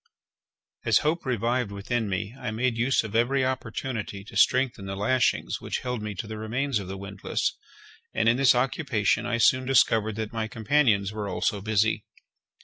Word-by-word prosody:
As - - +4
hope 155 -1 0
revived 120 -1 0
within 105 +2 -2
me, 100 +3 -3
I 125 - -3
made 115 +2 0
use 120 +3 +2
of 110 0 -7
every 130 +3 +2
opportunity 115 -6 -4
to 100 - -13
strengthen 125 -6 +2
the 95 - -4
lashings 120 +5 +1
which - - -3
held 125 -3 -3
me 105 -1 -5
to 95 - -5
the 110 0 -7
remains 120 +3 -1
of 95 - -7
the 95 +1 -6
windlass, 100 0 -2 0.6
and 110 - 0
in 115 +1 +4
this 135 -2 +5
occupation 120 -3 +1
I 120 -1 0
soon 130 +3 +3
discovered 110 -5 +3
that 110 0 -4
my 110 -1 -2
companions 110 -4 +2
were 105 -2 -4
also 100 0 -1
busy. 110 +1 +1
115 Hz, 175 wpm, -26 LUFS, 105-125 Hz, 0.6 s, this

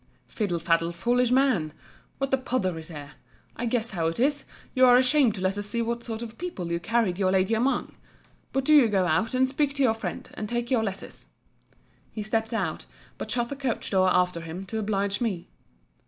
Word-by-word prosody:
Fiddle 200 -6 -2
faddle, 165 0 +1
foolish 240 +8 +1
man—What 260 - -1
a - - +5
pother 195 -10 -1
is 160 - -9
here! 145 -3 -9 0.4
I 240 - -3
guess 230 -1 -1
how 165 -4 -1
it 165 - -3
is: 285 +3 +1 0.3
you 255 - +3
are 245 0 +8
ashamed 255 -3 +3
to 190 - -6
let 190 +2 0
us 205 - -4
see 235 +2 -1
what 235 +1 -3
sort 225 0 -5
of 230 -1 -9
people 195 - -4
you 170 - 0
carried 210 -1 0
your 190 -2 +2
lady 190 +3 +2
among—but 265 +2 -3
do 305 - +5
you 275 -6 +7
go 195 -4 +2
out, 200 +9 +1
and 260 +1 +3
speak 280 +1 0
to 280 - +1
your 230 -4 +4
friend, 225 - -5
and 210 - -5
take 240 +1 -2
your 235 -4 +3
letters. 195 -2 -6 0.8
He 215 - -5
stept 225 +1 -1
out; 225 - -2 0.3
but - - -5
shut 240 -1 0
the 280 - -4
coach 265 -4 -2
door 185 -1 +4
after 180 -2 +2
him, 165 +4 -7
to 220 +3 -4
oblige 200 -1 -1
me. 195 -8 -2
220 Hz, 205 wpm, -26 LUFS, 185-250 Hz, 0.8 s, are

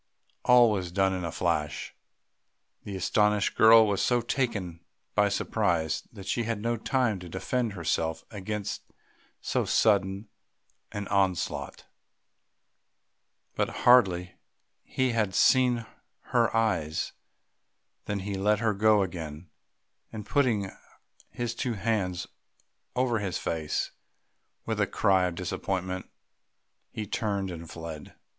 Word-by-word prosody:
All 125 -2 +6
was 95 -4 -2
done 95 +1 +2
in 90 -1 -3
a 85 - -3
flash; 80 -3 -2 0.9
the 100 - -5
astonished 105 +2 +2
girl 110 0 +8
was 100 -2 0
so 120 -1 +3
taken 115 -9 -2 0.3
by 105 0 +3
surprise 90 -6 0
that 100 -4 -11
she 110 +5 0
had 115 -2 -2
no 115 +2 0
time 115 -3 0
to 90 -1 -9
defend 115 +5 -2
herself 80 -2 -1
against 105 0 -4 0.6
so - - 0
sudden 100 -1 +2 0.6
an 105 -1 -5
onslaught. 95 -3 -1 1.7
But - - 0 0.2
hardly 95 -8 +5 0.5
had 120 -4 +1
he - - -12
seen 125 +1 +4 0.5
her 115 -2 +3
eyes 80 -9 0 0.9
than 105 -2 -2
he 100 +1 -4
let 105 +2 +2
her 110 0 +1
go 105 0 +4
again, 80 -3 -7 0.6
and 110 -2 -7
putting 110 -9 +1 0.6
his 120 -1 -3
two 120 0 -2
hands 95 -4 -1 0.7
over 125 -3 +1
his 95 -3 -2
face, 80 -2 -2 0.7
with - - -1
a - - +2
cry 95 -2 +3
of 90 -2 -2
disappointment, 95 +1 -3 0.8
he 110 - -5
turned 100 -2 -2
and 85 -1 -8
fled. 80 -2 -8
100 Hz, 120 wpm, -28 LUFS, 90-115 Hz, 1.7 s, girl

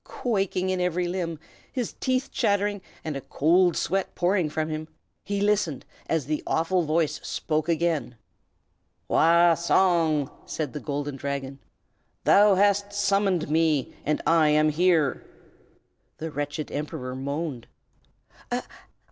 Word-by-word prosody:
Quaking 195 -5 -1
in 185 -1 -1
every 180 0 0
limb, 175 -2 -3 0.3
his 250 -3 -3
teeth 255 0 0
chattering, 205 -3 0 0.2
and 155 -2 -3
a 135 - -4
cold 170 +6 +2
sweat 195 +1 -1
pouring 180 -2 +1
from 155 +1 -2
him, 155 0 -4 0.4
he 200 0 -2
listened 200 -8 0 0.2
as 160 -5 0
the 150 +2 -2
awful 180 +3 +1
voice 155 -1 0
spoke 155 +1 -2
again. 160 -7 0 0.9
"Wah 170 +1 +5
Song!" 165 -4 +2 0.2
said 150 -5 -4
the 150 - -4
Golden 145 -1 -4
Dragon, 140 0 -4 0.6
"thou 205 0 +6
hast 200 +1 +2
summoned 195 -4 +1
me, 155 -4 +1
and 150 +1 -1
I 165 -2 +4
am 155 +1 +4
here!" 160 -3 +2 0.9
The 160 0 -5
wretched 145 +1 -4
Emperor 145 -3 -4
moaned. 140 -2 -4
165 Hz, 125 wpm, -26 LUFS, 150-185 Hz, 0.9 s, thou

